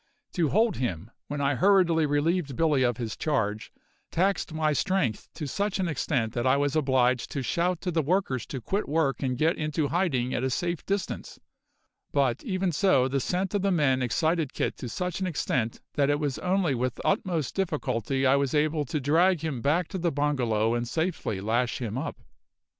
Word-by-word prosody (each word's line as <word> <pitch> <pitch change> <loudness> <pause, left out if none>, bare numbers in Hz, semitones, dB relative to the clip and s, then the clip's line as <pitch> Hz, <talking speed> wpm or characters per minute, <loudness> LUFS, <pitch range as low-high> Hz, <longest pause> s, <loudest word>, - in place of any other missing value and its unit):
To 165 -4 +1
hold 220 +6 +2
him 100 -4 -3 0.2
when 145 0 -3
I 140 0 +2
hurriedly 170 0 +4
relieved 145 0 0
Billy 150 -3 +2
of 120 -3 +2
his 115 -3 -4
charge 110 -8 -1 0.4
taxed 190 0 0
my 155 -1 +1
strength 150 - 0
to 150 - -4
such 200 +7 -1
an 185 - +1
extent 130 -7 -1
that 120 +1 0
I 130 +2 +4
was 145 +1 0
obliged 130 -4 +2
to 140 - -3
shout 175 +6 0
to 180 - -2
the 165 -1 +1
workers 150 - 0
to 135 - -5
quit 195 - -2
work 150 -3 +1
and 130 -2 -1
get 160 +4 +2
into 150 -1 -1
hiding 135 -9 0
at 125 - -1
a 130 - +1
safe 170 +5 -2
distance; 200 0 -3 0.7
but, 135 -5 +1
even 185 -2 -1
so, 140 -5 +3
the 135 +1 0
scent 185 +7 -1
of 205 - +1
the 200 - +1
men 145 -8 +2
excited 160 +4 0
Kit - - -1
to 125 - -6
such 180 +7 -3
an 190 - -1
extent 125 -8 -1
that 140 -1 +2
it 145 0 +2
was 145 -4 -2
only 180 -4 +1
with 125 0 -1
the - - -9
utmost 180 - 0
difficulty 135 - -1
I 135 +1 +5
was 140 +1 0
able 150 0 +1
to 150 +4 -2
drag 165 +5 +3
him 150 -7 -3
back 155 +6 +1
to 190 - -4
the 170 -1 +1
bungalow 125 -7 +1
and 120 0 -1
safely 160 - -2
lash 115 +4 0
him 115 -4 -4
up. 140 +5 -4
145 Hz, 195 wpm, -27 LUFS, 130-175 Hz, 0.7 s, I